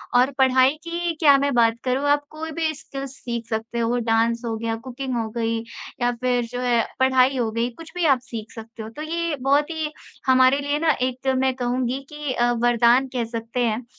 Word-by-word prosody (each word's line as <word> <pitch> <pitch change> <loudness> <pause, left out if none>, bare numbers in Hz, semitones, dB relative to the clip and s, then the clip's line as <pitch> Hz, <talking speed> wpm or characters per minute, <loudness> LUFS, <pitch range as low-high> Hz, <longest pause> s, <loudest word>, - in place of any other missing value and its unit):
और 250 +3 +5
पढ़ाई 260 0 +4
की 340 0 -2
क्या 285 -4 +6
मैं 280 0 0
बात 230 -1 +3
करूँ 260 +3 0
आप 290 0 +3
कोई 320 +1 -6
भी 315 0 -1
स्किल्स 275 -1 -7
सीख 235 -2 -4
सकते 225 +1 -3
हो 235 +1 +1
डांस 230 0 +1
हो 225 -1 -2
गया, 225 0 -2
कुकिंग 255 +3 -5
हो 225 -1 -2
गई 230 0 0 0.4
या 245 0 +3
फिर 250 -1 +1
जो 245 +2 -6
है 240 -2 +2 0.2
पढ़ाई 260 0 +4
हो 235 -3 0
गई 230 +2 -1
कुछ 330 -1 -11
भी 355 -2 0
आप 275 -4 +4
सीख 230 -4 -7
सकते 225 0 -9
हो। 215 - -7
तो 265 +7 -9
ये 335 0 -2
बहुत 285 +3 +2
ही 315 -2 -3 0.4
हमारे 260 +1 +5
लिए 285 +1 -1
ना 320 0 +3
एक 255 +1 -2
मैं 260 0 +2
कहूँगी 250 +1 -1
कि 295 -3 -4
अ, 240 -1 +2
वरदान 240 +2 +4
कह 245 -2 0
सकते 230 +1 -5
हैं, 230 +2 -1
255 Hz, 210 wpm, -23 LUFS, 235-280 Hz, 0.4 s, क्या